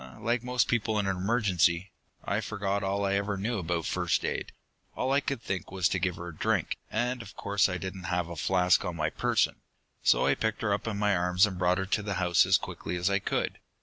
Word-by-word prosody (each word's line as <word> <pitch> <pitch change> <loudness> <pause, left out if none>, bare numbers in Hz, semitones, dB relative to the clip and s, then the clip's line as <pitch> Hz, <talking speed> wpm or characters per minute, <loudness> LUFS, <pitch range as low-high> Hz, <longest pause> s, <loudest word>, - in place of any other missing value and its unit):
"Like 120 +1 0
most 125 0 +1
people 110 -2 0
in 105 - +1
an 95 -1 0
emergency. 95 -3 +1 0.3
I - - 0
forgot 100 -1 -2
all 100 +1 0
I 100 - +1
ever 100 0 0
knew 110 +3 -1
about 85 -1 -2
first - - 0
aid. - - -3 0.4
All 130 - -1
I 140 - +4
could 140 -4 -3
think 95 -3 -3
of - - -13
was 95 -2 +2
to 95 - 0
give 90 -1 0
her 85 0 -7
a 80 - -10
drink, - - 0
and 125 +2 -1
of 105 -2 -11
course 100 -1 +1
I 90 - -2
didn't 95 +1 -6
have 90 -1 -1
a 85 - -7
flask 90 +3 +3
on 90 -3 -3
my 75 -1 -1
person. - - +1 0.4
So - - +4
I - - +4
picked 110 0 -2
her 105 -2 +2
up 100 +2 -3
in 105 -3 -2
my 105 -1 +2
arms 90 +2 +3
and 95 -3 -5
brought 90 0 +3
her 95 - -1
to 105 +2 0
the 100 -1 -3
house 90 -2 +3
as - - +6
quickly - - -5
as 90 +3 +1
I 100 - +2
could. - - -2
95 Hz, 245 wpm, -29 LUFS, 90-105 Hz, 0.4 s, as